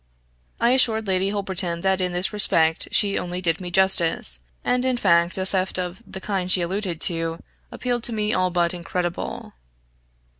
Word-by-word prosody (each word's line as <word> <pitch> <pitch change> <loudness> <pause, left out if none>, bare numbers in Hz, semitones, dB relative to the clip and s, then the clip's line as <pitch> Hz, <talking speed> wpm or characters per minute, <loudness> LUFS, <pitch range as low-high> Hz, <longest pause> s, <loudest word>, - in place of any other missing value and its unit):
I 235 - +2
assured 225 -4 +2
Lady 190 0 0
Holberton 190 -4 -1
that 190 0 0
in 180 -1 -1
this 180 +4 0
respect 165 -6 +4
she 200 -2 +2
only 180 0 -5
did 170 -1 -1
me 180 - -6
justice; 175 - +3 0.2
and, 250 0 0
in 255 -1 0
fact, 170 -4 +2
a 190 - -2
theft 190 0 -2
of 180 +3 -5
the 190 - -6
kind 190 -2 -3
she 180 -1 +2
alluded 185 -1 -4
to 165 -1 +1 0.3
appeared 245 -1 -3
to - - -1
me 215 -1 -2
all 185 0 0
but 175 -1 0
incredible. 175 0 -5
185 Hz, 175 wpm, -22 LUFS, 175-200 Hz, 0.3 s, respect